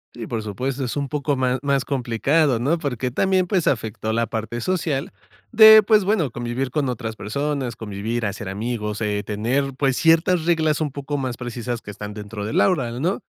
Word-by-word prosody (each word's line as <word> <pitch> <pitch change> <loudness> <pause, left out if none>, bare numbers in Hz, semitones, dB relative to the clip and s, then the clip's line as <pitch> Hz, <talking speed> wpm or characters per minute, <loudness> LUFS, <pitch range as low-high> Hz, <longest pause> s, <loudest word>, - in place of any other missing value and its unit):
Sí, 115 -2 -6
por 115 -3 -3
supuesto, 130 +6 -3
es 125 +3 -3
un 140 - -1
poco 145 0 -1
más 130 0 0
más 140 -2 +1
complicado, 135 +2 +1
¿no? 145 +8 +1
Porque 130 -5 -3
también, 185 +4 +1
pues, 185 -4 +1
afectó 110 -2 -1
la 115 +1 0
parte 115 +1 -4
social 155 -4 -2 0.4
de, 220 -1 +9
pues, 215 -1 +4
bueno, 185 - +1
convivir 120 +2 -3
con 140 +1 -1
otras 115 -2 -4
personas, 130 +3 -3
convivir, 110 +2 -3
hacer 100 -1 -4
amigos, 105 +1 -3
eh, 105 -2 -1
tener, 125 +6 -1
pues, 135 -1 +1
ciertas 165 +2 +3
reglas 160 -3 +2
un 150 -3 -1
poco 140 +1 -5
más 130 -3 -3
precisas 120 -1 -4
que 100 - -8
están 105 0 -7
dentro 105 0 -7
del 110 - 0
aula, 135 -11 +2
¿no? 180 +7 -1
130 Hz, 190 wpm, -22 LUFS, 115-150 Hz, 0.4 s, de